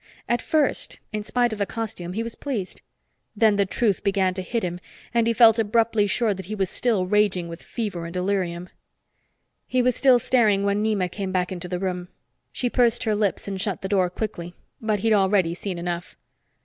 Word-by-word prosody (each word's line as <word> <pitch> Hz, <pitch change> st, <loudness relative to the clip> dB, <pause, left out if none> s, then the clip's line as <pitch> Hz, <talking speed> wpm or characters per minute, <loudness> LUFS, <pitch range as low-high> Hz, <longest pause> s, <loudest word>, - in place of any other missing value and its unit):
At 240 Hz, -, +1 dB
first, 310 Hz, -2 st, 0 dB, 0.2 s
in 210 Hz, -, -1 dB
spite 240 Hz, +1 st, +1 dB
of 215 Hz, -, -6 dB
the 200 Hz, -, 0 dB
costume, 200 Hz, -6 st, -5 dB
he 225 Hz, +4 st, -2 dB
was 230 Hz, 0 st, -5 dB
pleased. 230 Hz, -10 st, -5 dB, 0.5 s
Then 215 Hz, -1 st, +4 dB
the 200 Hz, -1 st, +2 dB
truth 205 Hz, 0 st, 0 dB
began 195 Hz, -2 st, +1 dB
to 190 Hz, -, -4 dB
hit 230 Hz, +5 st, -2 dB
him, 175 Hz, 0 st, -3 dB, 0.3 s
and 230 Hz, -1 st, +2 dB
he -, -, +3 dB
felt 230 Hz, -1 st, +6 dB
abruptly 220 Hz, -1 st, +2 dB
sure 215 Hz, +1 st, +1 dB
he 210 Hz, +4 st, -5 dB
was 190 Hz, -3 st, -1 dB
still 220 Hz, -7 st, +1 dB
raging 190 Hz, -3 st, +2 dB
with 165 Hz, 0 st, -8 dB
fever 195 Hz, -7 st, -4 dB
and 165 Hz, -, -6 dB
delirium. 180 Hz, -2 st, -1 dB, 1.0 s
He 255 Hz, -1 st, +1 dB
was 250 Hz, -1 st, +2 dB
still 260 Hz, -3 st, +5 dB
staring 220 Hz, -5 st, +2 dB
when 200 Hz, +1 st, +1 dB
Nema 210 Hz, -4 st, +1 dB
came 195 Hz, -1 st, -4 dB
back 180 Hz, -1 st, 0 dB
into 180 Hz, -1 st, -5 dB
the 180 Hz, 0 st, -3 dB
room. 180 Hz, -1 st, -3 dB, 0.4 s
She 250 Hz, -, -1 dB
pursed 240 Hz, -1 st, +2 dB
her 220 Hz, -3 st, +1 dB
lips 205 Hz, -2 st, -1 dB
and 195 Hz, -1 st, -3 dB
shut 190 Hz, -5 st, -3 dB
the -, -, -1 dB
door 190 Hz, -3 st, +2 dB
quickly. 175 Hz, -3 st, -5 dB, 0.3 s
But 215 Hz, -3 st, 0 dB
he'd 225 Hz, 0 st, +3 dB
already 190 Hz, -4 st, +3 dB
seen 180 Hz, +1 st, -5 dB
enough. 175 Hz, -, -4 dB
200 Hz, 200 wpm, -24 LUFS, 185-225 Hz, 1.0 s, felt